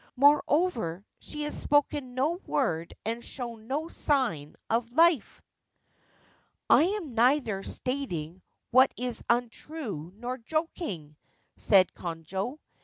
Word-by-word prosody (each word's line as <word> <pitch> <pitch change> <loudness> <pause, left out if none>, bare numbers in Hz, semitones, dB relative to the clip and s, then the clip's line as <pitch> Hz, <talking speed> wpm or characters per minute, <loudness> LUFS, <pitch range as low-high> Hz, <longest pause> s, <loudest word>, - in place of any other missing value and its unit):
Moreover, 280 - +3
she 300 0 -5
has 295 - -3
spoken 290 -3 +1
no 295 +7 +1
word 170 - -1
and 230 +2 -2
shown 235 -4 -5
no 295 +5 -2
sign 245 - 0
of 230 +1 0
life/ 330 -4 +3 0.6
* - - -35 0.5
I 315 - +7
am 370 - -2
neither 235 -3 +3
stating 190 - -4 0.3
what 260 +2 +6
is 245 -1 -2
untrue 235 - -2
nor 245 +4 -5
joking/ 235 - -3 0.4
said 190 -3 +4
Konojo. 180 - -4
245 Hz, 110 wpm, -28 LUFS, 195-290 Hz, 0.6 s, I